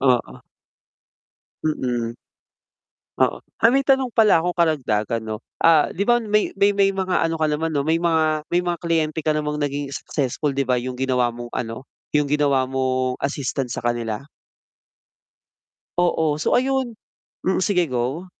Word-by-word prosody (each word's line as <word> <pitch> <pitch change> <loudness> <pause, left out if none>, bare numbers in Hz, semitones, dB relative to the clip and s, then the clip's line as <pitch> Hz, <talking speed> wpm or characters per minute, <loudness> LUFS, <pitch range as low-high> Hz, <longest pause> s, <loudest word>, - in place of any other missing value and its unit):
Oo. 125 -3 +1 1.2
Mm. 120 -6 -1 1.0
Oo, - - +2 0.2
ay 230 - +7
may 270 +2 +2
tanong 265 -2 +3
pala 215 -8 +4
akong 175 +1 -2
karagdagan 120 -9 +1
no. 110 -1 -5 0.2
Ah, 160 -2 +6
'di 195 - -1
ba 240 +3 +4
may 210 -2 +1
may 200 +1 +4
may 200 -1 +4
mga 190 -1 0
ano 165 0 0
ka 155 - +2
naman 155 +2 -1
no 145 -2 -1
may 160 - +3
mga 160 -2 +2
may 175 - +3
mga 175 -1 0
kliyente 160 -2 0
ka 155 - +1
namang 150 -1 -1
naging 145 0 -2
successful 145 +1 -2
'di 140 -1 -1
ba, 125 - +2
yung 125 0 -5
ginawa 125 -2 +1
mong 120 +1 -8
ano 115 +2 -4 0.2
yung 150 -1 +2
ginawa 145 -3 +3
mong 130 -1 0
assistant 135 -2 -2
sa - - -5
kanila. 115 -1 -2 1.8
Oo. 160 -3 +2
So - - +3
ayun, 260 -3 -1 0.5
mm, 190 0 +2
sige 180 -3 +2
go. 130 +6 -2
150 Hz, 155 wpm, -22 LUFS, 130-175 Hz, 1.8 s, ay